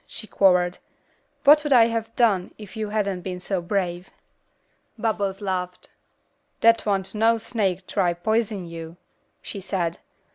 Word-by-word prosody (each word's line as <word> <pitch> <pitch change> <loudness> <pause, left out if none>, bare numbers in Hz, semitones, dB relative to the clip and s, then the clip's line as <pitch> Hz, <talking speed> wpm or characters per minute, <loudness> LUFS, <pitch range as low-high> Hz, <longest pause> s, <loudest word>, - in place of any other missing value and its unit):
she 220 - -7
quavered. 180 -3 +3 0.6
"What 295 +1 +7
would 295 - -3
I 235 -3 +7
have 230 -1 -3
done 200 -7 +2
if 210 0 -11
you 215 -1 -3
hadn't 200 -3 -1
been 180 0 -5
so 185 0 -2
brave?" 180 -1 -2 0.9
Bubbles 210 -3 -1
laughed. 180 -2 -4 0.7
"Dat 230 -1 +4
wan't 195 -2 -1
no 225 +2 +3
snake 200 -5 -2
to 180 -4 0
pison 220 -4 0
yuh," 165 0 -8 0.5
she 200 - -7
said. 175 -3 -2
200 Hz, 140 wpm, -24 LUFS, 180-220 Hz, 0.9 s, What